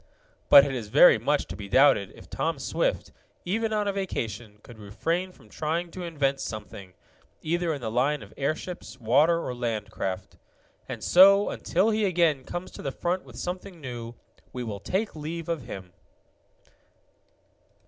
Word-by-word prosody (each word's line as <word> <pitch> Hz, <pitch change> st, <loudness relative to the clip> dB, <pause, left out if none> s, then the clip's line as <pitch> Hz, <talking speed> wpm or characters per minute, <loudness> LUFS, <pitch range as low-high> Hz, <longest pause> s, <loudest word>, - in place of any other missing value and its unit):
But 140 Hz, -, +10 dB
it 140 Hz, -, -3 dB
is 120 Hz, -5 st, -4 dB
very 105 Hz, -, +7 dB
much -, -, +1 dB
to -, -, -8 dB
be 100 Hz, -1 st, -8 dB
doubted 120 Hz, -5 st, +4 dB
if -, -, -14 dB
Tom -, -, -2 dB
Swift, -, -, -1 dB, 0.3 s
even 220 Hz, +5 st, -1 dB
on 210 Hz, -1 st, 0 dB
a 200 Hz, -, 0 dB
vacation, 115 Hz, -, -4 dB
could 120 Hz, -2 st, -13 dB
refrain 165 Hz, -, -2 dB
from -, -, -20 dB
trying 165 Hz, +3 st, -3 dB
to 185 Hz, -, -8 dB
invent 140 Hz, -5 st, -1 dB
something, 100 Hz, -5 st, -7 dB, 0.5 s
either 170 Hz, +1 st, 0 dB
in 145 Hz, -4 st, -4 dB
the 110 Hz, -2 st, -3 dB
line 135 Hz, +5 st, +1 dB
of -, -, -14 dB
airships, 155 Hz, +5 st, -4 dB
water, 150 Hz, +9 st, +3 dB
or 125 Hz, -, -3 dB
land 115 Hz, -4 st, -3 dB
craft. 95 Hz, -3 st, -5 dB, 0.5 s
And -, -, -6 dB
so, 200 Hz, +3 st, +7 dB
until 195 Hz, +6 st, +1 dB
he 215 Hz, 0 st, +1 dB
again 170 Hz, -7 st, +2 dB
comes 175 Hz, +1 st, -6 dB
to -, -, -10 dB
the 135 Hz, -, -3 dB
front 180 Hz, +6 st, -2 dB
with -, -, -13 dB
something 180 Hz, 0 st, -5 dB
new, 120 Hz, -4 st, -7 dB, 0.4 s
we 125 Hz, -, -5 dB
will 105 Hz, -4 st, -5 dB
take 200 Hz, -, -2 dB
leave 160 Hz, +2 st, -5 dB
of 165 Hz, -7 st, -3 dB
him. 95 Hz, -5 st, -8 dB
150 Hz, 170 wpm, -27 LUFS, 115-175 Hz, 0.5 s, But